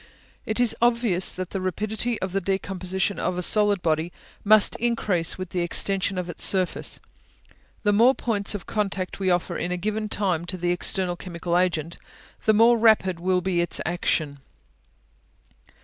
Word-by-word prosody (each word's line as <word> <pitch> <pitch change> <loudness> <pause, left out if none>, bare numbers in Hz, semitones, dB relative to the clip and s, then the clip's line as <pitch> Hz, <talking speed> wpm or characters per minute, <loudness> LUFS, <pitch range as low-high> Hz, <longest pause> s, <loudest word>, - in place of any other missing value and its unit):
It 220 +2 -2
is 240 -2 +3
obvious 235 -6 +2
that 185 -1 -6
the 195 - -4
rapidity 215 +5 -2
of 190 - -3
the 195 +1 -1
decomposition 190 0 -2
of 180 - -2
a 180 - -1
solid 205 -1 +3
body 160 +1 0 0.3
must 215 0 +5
increase 210 -8 -1
with 185 -1 -7
the 180 - -2
extension 190 +2 0
of 180 -1 -3
its 175 - -1
surface; 185 -3 +3 0.8
the 205 -1 +2
more 240 +6 +4
points 210 -3 -1
of 205 - -7
contact 195 -4 -3
we 190 -1 0
offer 175 -1 0
in 180 - -3
a 180 - -2
given 215 +3 -3
time 180 -6 -1
to 185 +1 -4
the 175 0 -1
external 175 0 +1
chemical 170 -1 -4
agent, 170 -3 -1 0.5
the 220 - +4
more 230 +2 +5
rapid 210 -6 +3
will 180 +1 0
be 180 -1 0
its 170 -1 +1
action. 155 -4 -1
185 Hz, 165 wpm, -24 LUFS, 175-210 Hz, 0.8 s, must